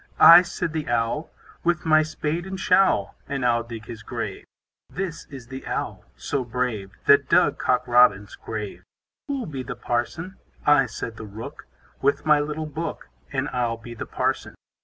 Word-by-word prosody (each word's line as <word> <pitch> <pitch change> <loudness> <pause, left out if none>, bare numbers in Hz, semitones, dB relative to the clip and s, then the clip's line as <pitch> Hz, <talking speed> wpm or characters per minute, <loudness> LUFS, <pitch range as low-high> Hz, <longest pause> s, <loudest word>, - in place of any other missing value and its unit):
I, 170 +1 +11
said 175 -2 -4
the 155 -4 -3
Owl, 120 +6 0 0.3
With 170 -1 +1
my 155 -1 +6
spade 155 +2 -3
and 190 0 -5
showl, 185 - +3 0.2
And 135 -3 -2
I'll 120 -1 +3
dig 115 -1 -8
his 115 -2 -8
grave. - - -5 0.4
This 180 -3 -5
is 130 -5 -10
the 130 0 -7
Owl - - -3
so 140 -3 -2
brave, 115 -5 -2 0.2
That 140 -1 +5
dug - - +4
Cock 125 0 +1
Robin's 120 -5 +4
grave. 105 -2 -6 0.4
Who'll 275 -3 -2
be 140 -5 -5
the - - -6
Parson? 165 +10 -3 0.3
I, 145 -3 +5
said 115 0 -6
the 110 - -8
Rook, 105 +3 -9 0.3
With 140 +3 +1
my 150 -1 +5
little 150 +1 -3
book, 155 - -5 0.2
And - - -1
I'll 120 -2 -1
be 120 +1 -10
the 115 - -7
Parson. - - -2
135 Hz, 170 wpm, -24 LUFS, 115-155 Hz, 0.4 s, I